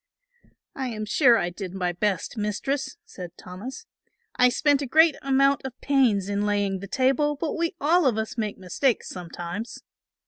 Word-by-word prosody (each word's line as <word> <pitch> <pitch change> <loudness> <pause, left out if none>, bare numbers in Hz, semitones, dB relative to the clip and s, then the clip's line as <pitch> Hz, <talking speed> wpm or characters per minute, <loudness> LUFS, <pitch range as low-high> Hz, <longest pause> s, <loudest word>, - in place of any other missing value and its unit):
"I 265 -1 -3
am 215 -3 -4
sure 240 +1 +5
I 175 -3 -1
did 185 0 -7
my 180 -2 -1
best, 190 +4 -2
Mistress," 260 +6 -2
said 180 -3 -10
Thomas; 195 +9 -9 0.5
"I 250 0 +5
spent 285 +3 +2
a 280 - -3
great 315 +2 +5
amount 275 +1 +3
of 265 -2 -7
pains 245 -9 +2
in 205 0 -1
laying 205 -2 0
the 200 - -8
table, 275 +5 +1
but 300 +2 -3
we 335 0 -1
all 325 +2 +3
of 235 -4 +1
us 220 0 -3
make 215 -4 -3
mistakes 210 +7 -1
sometimes." 175 +5 -7
230 Hz, 170 wpm, -25 LUFS, 200-275 Hz, 0.5 s, sure